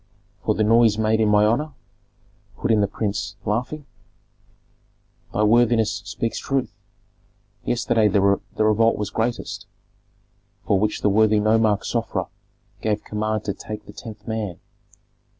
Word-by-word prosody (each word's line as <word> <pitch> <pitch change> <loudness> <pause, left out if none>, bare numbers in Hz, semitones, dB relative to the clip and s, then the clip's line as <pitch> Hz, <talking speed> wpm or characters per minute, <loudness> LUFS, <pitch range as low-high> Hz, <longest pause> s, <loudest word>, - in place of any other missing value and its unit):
"For 110 - +1
the 110 - +1
noise 115 0 +4
made 110 0 +2
in 110 -1 +3
my 105 0 +5
honor?" 145 +8 0 0.8
put - - 0
in 110 -2 +4
the 100 - +2
prince, 100 0 -3
laughing. 125 +7 -2 1.5
"Thy 105 - 0
worthiness 115 0 +3
speaks 115 - -3
truth. 135 -5 -2 0.9
Yesterday 115 -2 +2
the 100 0 +2
revolt 110 +3 +2
was 105 - -3
greatest, 115 +2 -3 1.0
for 100 - +2
which 105 +1 -1
the 105 - +3
worthy 110 +1 +4
nomarch 110 0 +2
Sofra 110 -6 -2 0.6
gave 105 -1 -1
command 110 0 -2
to 100 - -2
take 105 0 -8
the - - -12
tenth 105 -3 -10
man. 110 -6 -3
110 Hz, 135 wpm, -23 LUFS, 105-115 Hz, 1.5 s, my